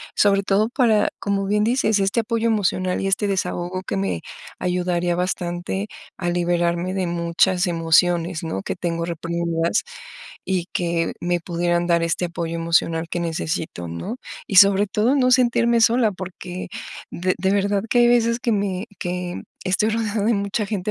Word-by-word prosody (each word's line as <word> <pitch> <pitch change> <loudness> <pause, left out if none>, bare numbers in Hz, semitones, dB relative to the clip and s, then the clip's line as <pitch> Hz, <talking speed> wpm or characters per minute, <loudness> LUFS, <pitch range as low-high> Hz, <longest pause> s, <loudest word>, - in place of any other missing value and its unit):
sobre 200 -1 +4
todo 200 +3 +1
para, 235 -4 +3
como 200 -1 -1
bien 210 +1 +1
dices, 220 -3 +2
este 195 +4 +1
apoyo 230 0 -1
emocional 185 -4 0
y - - -2
este 195 +2 +1
desahogo 185 -1 -2
que 100 - -3
me 95 -4 -1 0.4
ayudaría 180 -1 0
bastante 180 +2 -2 0.3
a 175 -1 -2
liberarme 175 +1 0
de 190 -2 0
muchas 175 +2 +1
emociones, 170 0 +2
¿no?, 95 -12 -3
que - - -3
tengo 170 -1 -2
reprimidas 170 +1 -1 0.6
y 185 -2 -1
que 170 -1 0
me 175 0 0
pudieran 175 0 0
dar 170 -1 +2
este 165 +2 0
apoyo 170 -1 -3
emocional 165 0 +1
que 175 - -3
necesito, 160 - -3
¿no? 85 - -5 0.3
Y 195 - -1
sobre 200 +1 +7
todo, 215 +7 +2
no 255 -3 +3
sentirme 235 -2 +3
sola 230 0 +4
porque 185 -1 -7 0.4
de 185 +1 -1
de 190 +1 +1
verdad 200 0 +1
que 245 - +2
hay 240 - +6
veces 235 0 +3
que 235 - 0
me 200 -2 -1
que 180 0 -4 0.2
estoy 190 +3 +2
rodeada 215 -2 -1
de 230 - +3
mucha 200 +1 -1
gente, 205 -1 -2
185 Hz, 165 wpm, -22 LUFS, 170-205 Hz, 0.6 s, sobre